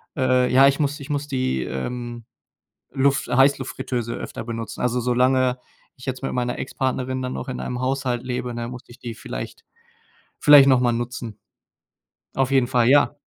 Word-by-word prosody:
äh, 130 Hz, -2 st, +2 dB
ja, 135 Hz, +1 st, +7 dB
ich 140 Hz, -, +1 dB
muss 145 Hz, 0 st, 0 dB
ich 140 Hz, -, -10 dB
muss 145 Hz, 0 st, -2 dB
die, 130 Hz, -, -1 dB
ähm, 120 Hz, -, -5 dB, 0.7 s
Luft 135 Hz, -1 st, +1 dB
äh, 125 Hz, -, -1 dB
Heißluftfritteuse 130 Hz, -3 st, +1 dB
öfter -, -, -6 dB
benutzen. 115 Hz, -1 st, -6 dB
Also, 125 Hz, 0 st, 0 dB
solange 125 Hz, +1 st, +2 dB, 0.4 s
ich 125 Hz, -, -12 dB
jetzt 130 Hz, 0 st, -4 dB
mit 135 Hz, -, -2 dB
meiner 125 Hz, -1 st, -2 dB
Ex-Partnerin 130 Hz, 0 st, -2 dB
dann 130 Hz, 0 st, -4 dB
auch -, -, -5 dB
in 125 Hz, -, -4 dB
einem 125 Hz, 0 st, -4 dB
Haushalt 130 Hz, -2 st, -1 dB
lebe, 125 Hz, -1 st, -3 dB
ne, 120 Hz, 0 st, -4 dB
muss 125 Hz, 0 st, -9 dB
ich 120 Hz, -, -14 dB
die 120 Hz, -2 st, -7 dB
vielleicht -, -, -8 dB, 0.7 s
vielleicht 145 Hz, -2 st, +8 dB
noch 130 Hz, -2 st, +5 dB
mal 125 Hz, -1 st, +2 dB
nutzen. 120 Hz, -2 st, -5 dB, 0.9 s
Auf 135 Hz, 0 st, +1 dB
jeden 135 Hz, -2 st, +3 dB
Fall, 125 Hz, -2 st, +3 dB
ja. 145 Hz, +1 st, +4 dB
125 Hz, 175 wpm, -23 LUFS, 120-135 Hz, 0.9 s, vielleicht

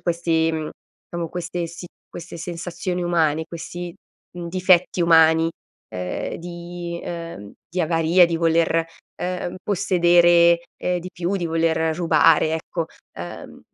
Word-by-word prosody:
questi, 165 Hz, -2 st, +1 dB
mhmm 155 Hz, -1 st, -3 dB, 0.4 s
diciamo 170 Hz, -1 st, -3 dB
queste 175 Hz, 0 st, -4 dB
si 170 Hz, +2 st, -9 dB, 0.2 s
queste 170 Hz, 0 st, -9 dB
sensazioni 175 Hz, +1 st, -4 dB
umane, 160 Hz, -2 st, +1 dB
questi, 175 Hz, +1 st, -7 dB, 0.4 s
mhmm, 170 Hz, -1 st, -5 dB
difetti 185 Hz, 0 st, +3 dB
umani, 165 Hz, -1 st, +5 dB, 0.4 s
ehm, 90 Hz, 0 st, -4 dB
di 175 Hz, 0 st, -7 dB
ehm, 165 Hz, -12 st, -7 dB, 0.2 s
di 180 Hz, +3 st, -2 dB
avaria, 165 Hz, +2 st, +4 dB
di 170 Hz, -1 st, 0 dB
voler, 165 Hz, 0 st, +2 dB
e 165 Hz, 0 st, +1 dB, 0.3 s
ehm, 180 Hz, 0 st, -3 dB
possedere, 175 Hz, -3 st, +4 dB, 0.2 s
ehm, 180 Hz, 0 st, -1 dB
di 185 Hz, -, -7 dB
più, 180 Hz, +3 st, -2 dB
di 175 Hz, -3 st, -1 dB
voler 160 Hz, 0 st, +1 dB
rubare 160 Hz, -2 st, +4 dB
ecco, 165 Hz, +1 st, -3 dB, 0.3 s
uhm, -, -, -8 dB
170 Hz, 130 wpm, -22 LUFS, 165-175 Hz, 0.4 s, umani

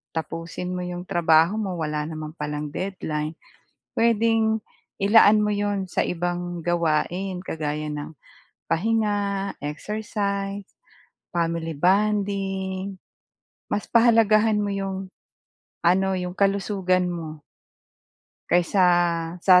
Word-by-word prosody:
tapusin 165 Hz, +2 st, -4 dB
mo 180 Hz, -, -3 dB
'yong 180 Hz, 0 st, -5 dB
trabaho 170 Hz, +2 st, +3 dB
mo 190 Hz, -4 st, -2 dB
wala 150 Hz, -2 st, -2 dB
naman 155 Hz, -1 st, -6 dB
palang 150 Hz, 0 st, -3 dB
deadline, 160 Hz, -5 st, -3 dB, 0.6 s
puwedeng 225 Hz, -1 st, +3 dB, 0.4 s
ilaan 210 Hz, +1 st, +6 dB
mo 210 Hz, -, +1 dB
'yon 205 Hz, -2 st, -1 dB
sa -, -, 0 dB
ibang 175 Hz, 0 st, -3 dB
gawain 175 Hz, +3 st, 0 dB
kagaya 155 Hz, -3 st, -3 dB
ng 150 Hz, +1 st, -5 dB, 0.6 s
pahinga, 205 Hz, 0 st, 0 dB
exercise, 200 Hz, +4 st, -3 dB, 0.6 s
family 165 Hz, -1 st, -1 dB
bonding. 195 Hz, +1 st, 0 dB, 0.7 s
Mas 205 Hz, -, -1 dB
pahalagahan 225 Hz, -2 st, +4 dB
mo 205 Hz, -, -1 dB
'yong 195 Hz, -1 st, -3 dB, 0.7 s
ano 190 Hz, +2 st, +3 dB
yung 180 Hz, 0 st, -4 dB
kalusugan 195 Hz, -2 st, +1 dB
mo. 160 Hz, -3 st, -6 dB, 1.1 s
Kaysa 180 Hz, +2 st, +3 dB, 0.6 s
sa 180 Hz, -2 st, +8 dB
190 Hz, 100 wpm, -24 LUFS, 165-205 Hz, 1.1 s, sa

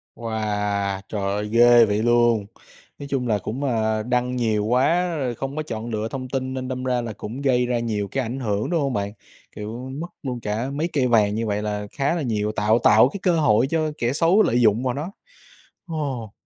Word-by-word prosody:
Wow! 105 Hz, -3 st, -2 dB
Trời 105 Hz, -, -3 dB
ơi, 105 Hz, +2 st, -2 dB
ghê 120 Hz, 0 st, +7 dB
vậy 105 Hz, 0 st, 0 dB
luôn. 120 Hz, -3 st, +3 dB, 0.5 s
Nói 140 Hz, -, -7 dB
chung 130 Hz, -3 st, -1 dB
là 110 Hz, -2 st, +2 dB
cũng, 115 Hz, +8 st, -5 dB
à, 110 Hz, -4 st, 0 dB
đăng 125 Hz, +1 st, 0 dB
nhiều 110 Hz, -4 st, 0 dB
quá, 165 Hz, +9 st, +2 dB
rồi 125 Hz, -4 st, -2 dB
không 135 Hz, +4 st, -5 dB
có 155 Hz, -, -2 dB
chọn 115 Hz, -5 st, -5 dB
lựa 110 Hz, -1 st, -2 dB
thông 130 Hz, +1 st, -6 dB
tin 130 Hz, 0 st, -2 dB
nên 130 Hz, -1 st, -4 dB
đâm 130 Hz, 0 st, -4 dB
ra 125 Hz, -1 st, 0 dB
là 115 Hz, -2 st, -5 dB
cũng 115 Hz, +6 st, -7 dB
gây 125 Hz, -3 st, +2 dB
ra 120 Hz, -1 st, 0 dB
nhiều 105 Hz, -3 st, -2 dB
cái 135 Hz, -, 0 dB
ảnh 125 Hz, +3 st, -4 dB
hưởng, 105 Hz, -4 st, -1 dB
đúng 170 Hz, -3 st, +1 dB
hông 135 Hz, -2 st, -1 dB
bạn? 100 Hz, -1 st, -2 dB, 0.4 s
Kiểu, 115 Hz, +5 st, -6 dB
mất 170 Hz, -, -4 dB, 0.2 s
luôn 125 Hz, -3 st, -3 dB
cả 110 Hz, +4 st, -2 dB
mấy 155 Hz, +4 st, -1 dB
cây 135 Hz, -4 st, +2 dB
vàng 105 Hz, -4 st, +3 dB
như 115 Hz, 0 st, -2 dB
vậy 105 Hz, 0 st, -1 dB
là 105 Hz, -1 st, -3 dB
khá 145 Hz, +3 st, 0 dB
là 170 Hz, -, -2 dB
nhiều, 105 Hz, -5 st, -1 dB
tạo 110 Hz, +2 st, +2 dB
tạo 110 Hz, +1 st, +6 dB
cái 200 Hz, -, -7 dB
cơ 175 Hz, -2 st, +3 dB
hội 115 Hz, -3 st, +3 dB
cho 155 Hz, +1 st, 0 dB
kẻ 120 Hz, +2 st, 0 dB
xấu 170 Hz, +7 st, +4 dB
lợi 120 Hz, -, +2 dB
dụng 110 Hz, +1 st, +3 dB
vào 125 Hz, -1 st, 0 dB
nó. 150 Hz, +8 st, -5 dB, 0.8 s
Ồ. 140 Hz, -, -4 dB
120 Hz, 220 wpm, -23 LUFS, 110-135 Hz, 0.8 s, ghê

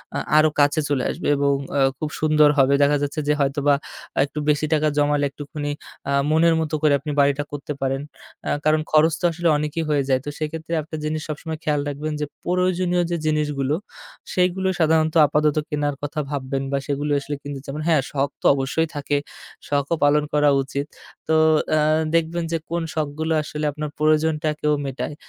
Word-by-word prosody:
আ -, -, 0 dB, 0.2 s
আরও 155 Hz, 0 st, +6 dB
কাছে 145 Hz, +1 st, +4 dB
চলে 135 Hz, -3 st, +1 dB
আসবে -, -, -5 dB
এবং 140 Hz, 0 st, +2 dB, 0.2 s
অ -, -, +3 dB, 0.2 s
খুব 155 Hz, -, -3 dB
সুন্দর 155 Hz, -1 st, +4 dB
হবে। 135 Hz, 0 st, +4 dB
দেখা 145 Hz, +1 st, +3 dB
যাচ্ছে 145 Hz, +2 st, -2 dB
যে 150 Hz, -, +4 dB
হয়তোবা 140 Hz, +1 st, +2 dB, 0.5 s
একটু 150 Hz, +1 st, -6 dB
বেশি 150 Hz, 0 st, +2 dB
টাকা 155 Hz, 0 st, +2 dB
জমালে 145 Hz, 0 st, +2 dB
একটুখানি 145 Hz, +1 st, -5 dB, 0.4 s
আ -, -, +1 dB, 0.2 s
মনের 165 Hz, +1 st, +4 dB
মতো 155 Hz, -1 st, -2 dB
করে 155 Hz, -2 st, +4 dB
আপনি 150 Hz, -, -5 dB
বাড়িটা 140 Hz, 0 st, +3 dB
করতে 145 Hz, 0 st, -5 dB
পারেন। 135 Hz, 0 st, -1 dB, 0.5 s
আ -, -, 0 dB, 0.2 s
কারণ 155 Hz, 0 st, +3 dB
খরচ 155 Hz, +1 st, +5 dB
তো -, -, +1 dB
আসলে 170 Hz, +1 st, -1 dB
অনেকই 150 Hz, +2 st, -2 dB
হয়ে 145 Hz, -2 st, +2 dB
যায়। 130 Hz, -1 st, +3 dB
তো -, -, -3 dB
সেক্ষেত্রে 160 Hz, +2 st, -4 dB
একটা 155 Hz, +1 st, -8 dB
জিনিস 155 Hz, 0 st, -2 dB
সবসময় 155 Hz, +1 st, -5 dB
খেয়াল 150 Hz, -1 st, +1 dB
রাখবেন 150 Hz, +2 st, -4 dB
যে -, -, +1 dB, 0.2 s
প্রয়োজনীয় 180 Hz, 0 st, +1 dB
যে 170 Hz, -, 0 dB
জিনিসগুলো 150 Hz, -2 st, 0 dB, 0.6 s
সেগুলো 185 Hz, +1 st, +1 dB
সাধারণত 160 Hz, -1 st, +2 dB
আপাতত 150 Hz, +1 st, +1 dB
কেনার 145 Hz, -1 st, -1 dB
কথা 145 Hz, +2 st, -4 dB
ভাববেন 135 Hz, -1 st, -3 dB
বা 140 Hz, -, +1 dB
সেগুলো 145 Hz, +1 st, 0 dB
আসলে 145 Hz, +1 st, -4 dB
কিনবেন। 145 Hz, +1 st, -10 dB, 0.2 s
যেমন 145 Hz, +3 st, -4 dB
হ্যাঁ, 160 Hz, -4 st, +4 dB
শখ 140 Hz, 0 st, 0 dB
তো -, -, -11 dB
অবশ্যই 135 Hz, +4 st, 0 dB
থাকে, 145 Hz, 0 st, -1 dB, 0.5 s
শখও 145 Hz, +3 st, +1 dB
পালন 145 Hz, +1 st, +4 dB
করা 150 Hz, 0 st, +4 dB
উচিত। 140 Hz, +1 st, -4 dB, 0.4 s
তো 160 Hz, -, +2 dB, 0.4 s
অ্যা 155 Hz, -, +3 dB, 0.3 s
দেখবেন 165 Hz, +1 st, 0 dB
যে 165 Hz, -, +1 dB
কোন 170 Hz, +1 st, -1 dB
শখগুলো 155 Hz, +1 st, -1 dB
আসলে 150 Hz, 0 st, -4 dB
আপনার 150 Hz, +1 st, -5 dB
প্রয়োজনটাকেও 155 Hz, 0 st, +1 dB
মেটায়। 135 Hz, +2 st, -4 dB
150 Hz, 180 wpm, -22 LUFS, 145-155 Hz, 0.6 s, আরও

